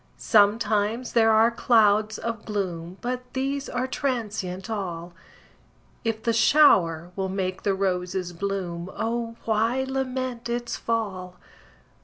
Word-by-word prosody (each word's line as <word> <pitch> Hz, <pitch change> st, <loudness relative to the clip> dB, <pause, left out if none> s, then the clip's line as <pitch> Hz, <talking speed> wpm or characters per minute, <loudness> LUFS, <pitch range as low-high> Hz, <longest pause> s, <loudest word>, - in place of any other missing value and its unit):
Sometimes 215 Hz, +2 st, +2 dB
there 225 Hz, -1 st, +5 dB
are 220 Hz, +2 st, +5 dB
clouds 215 Hz, -2 st, +3 dB
of 230 Hz, -2 st, -4 dB
gloom, 185 Hz, -4 st, -4 dB
But 250 Hz, +1 st, -2 dB
these 275 Hz, +1 st, -2 dB
are 250 Hz, +1 st, -1 dB
transient 215 Hz, -9 st, -3 dB
all; 175 Hz, -6 st, -4 dB, 0.9 s
If 225 Hz, -1 st, -2 dB
the 230 Hz, -, +1 dB
shower 180 Hz, -, +4 dB
will 190 Hz, -1 st, -2 dB
make 185 Hz, -1 st, -3 dB
the 200 Hz, -1 st, +1 dB
roses 180 Hz, -1 st, -2 dB
bloom, 180 Hz, -2 st, -4 dB
O 230 Hz, 0 st, -2 dB
why 225 Hz, +4 st, +1 dB
lament 255 Hz, -2 st, -3 dB
its 240 Hz, 0 st, -2 dB
fall? 190 Hz, -6 st, -3 dB
215 Hz, 120 wpm, -25 LUFS, 190-235 Hz, 0.9 s, there